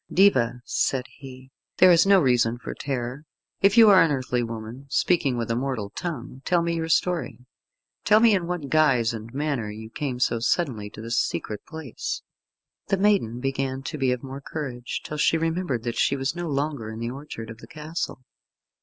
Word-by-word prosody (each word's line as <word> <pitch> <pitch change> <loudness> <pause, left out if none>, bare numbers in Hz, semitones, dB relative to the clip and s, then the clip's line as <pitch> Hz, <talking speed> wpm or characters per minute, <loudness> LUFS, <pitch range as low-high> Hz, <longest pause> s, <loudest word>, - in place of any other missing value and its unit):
"Diva," 125 -11 +3
said 130 -1 0
he, 130 -1 -12 0.3
"there 185 0 +7
is 170 +2 +5
no 200 -1 +7
reason 120 -5 +2
for - - -6
terror. 130 0 -4 0.4
If 195 +3 +4
you 225 -1 +9
are 190 -3 +8
an 165 - +4
earthly 130 -3 0
woman, 115 +3 -6
speaking 140 -5 +2
with 115 -1 -2
a - - +1
mortal 120 -5 -2
tongue, 135 -7 -6
tell 175 -2 +2
me 170 0 0
your 165 -1 -2
story. 165 -7 0 0.6
Tell 215 0 +5
me 225 -1 +6
in 180 -4 0
what 175 -5 -3
guise 130 -7 +3
and 115 0 -7
manner 140 -5 -2
you 110 +1 -9
came 130 -3 -3
so 120 -2 +1
suddenly 115 - 0
to 110 - -10
this 115 +1 0
secret 105 - -3
place." 160 -7 -5 0.6
The 195 - +1
maiden 190 - +2
began 135 0 -2
to 150 - -5
be 130 -2 +2
of 125 0 -2
more 135 +1 -7
courage, 130 -5 -5
till 150 - -6
she 165 - +3
remembered 165 -6 -1
that 120 -1 -3
she 140 - +3
was 135 +3 -2
no 175 -1 -4
longer 140 -5 -2
in 110 - -7
the 115 +1 -3
orchard 130 -5 -8
of 115 - -11
the - - -12
castle. 155 -2 -5
135 Hz, 195 wpm, -25 LUFS, 120-165 Hz, 0.6 s, you